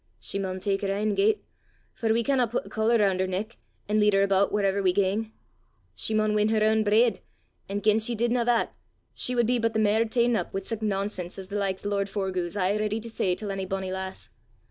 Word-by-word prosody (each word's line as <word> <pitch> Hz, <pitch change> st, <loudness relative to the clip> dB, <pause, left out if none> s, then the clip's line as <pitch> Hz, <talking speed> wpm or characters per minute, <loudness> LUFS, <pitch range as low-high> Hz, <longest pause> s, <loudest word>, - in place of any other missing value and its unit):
She 200 Hz, -, -4 dB
maun 190 Hz, -1 st, -3 dB
tak 195 Hz, +1 st, -1 dB
her 195 Hz, -1 st, -1 dB
ain 210 Hz, +1 st, 0 dB
gait, 425 Hz, +2 st, +2 dB, 0.5 s
for 225 Hz, -1 st, -1 dB
we 230 Hz, +1 st, +2 dB
canna 260 Hz, -1 st, +2 dB
put 235 Hz, -, -3 dB
a -, -, -11 dB
collar 225 Hz, +2 st, +2 dB
roon' 195 Hz, -4 st, +2 dB
her 190 Hz, -, +1 dB
neck, 200 Hz, +5 st, -4 dB, 0.3 s
an' 210 Hz, +1 st, +2 dB
lead 210 Hz, 0 st, +4 dB
her 195 Hz, 0 st, +4 dB
aboot 195 Hz, 0 st, +2 dB
whaurever 200 Hz, -1 st, +1 dB
we 185 Hz, -2 st, +3 dB
gang. 205 Hz, +3 st, 0 dB, 0.6 s
She 220 Hz, -, -3 dB
maun 215 Hz, 0 st, +2 dB
win 210 Hz, 0 st, +2 dB
her 220 Hz, -1 st, +2 dB
ain 220 Hz, 0 st, +3 dB
breid; 220 Hz, +3 st, +3 dB, 0.5 s
an' 200 Hz, +1 st, -2 dB
gien 215 Hz, 0 st, +4 dB
she 235 Hz, +2 st, 0 dB
didna 235 Hz, +2 st, +1 dB
that, 240 Hz, -1 st, +1 dB, 0.4 s
she 250 Hz, -, -3 dB
wad 240 Hz, -1 st, +3 dB
be 245 Hz, +1 st, +1 dB
but 230 Hz, 0 st, 0 dB
the 220 Hz, -, +1 dB
mair 215 Hz, +1 st, +3 dB
ta'en 235 Hz, +1 st, +2 dB
up -, -, -3 dB
wi' 195 Hz, -, -1 dB
sic 225 Hz, +2 st, -4 dB
nonsense 195 Hz, -3 st, -2 dB
as 190 Hz, -1 st, -8 dB
the 205 Hz, -, -5 dB
likes 195 Hz, -1 st, -2 dB
o' -, -, 0 dB
lord 200 Hz, -1 st, 0 dB
Forgue 190 Hz, -3 st, -2 dB
's 170 Hz, -, -7 dB
aye 195 Hz, +2 st, +1 dB
ready 215 Hz, +1 st, -1 dB
to 230 Hz, +1 st, -8 dB
say 185 Hz, -4 st, 0 dB
til 205 Hz, 0 st, -5 dB
ony 195 Hz, -1 st, -3 dB
bonnie 190 Hz, 0 st, -3 dB
lass. 190 Hz, 0 st, -6 dB
210 Hz, 240 wpm, -26 LUFS, 195-225 Hz, 0.6 s, lead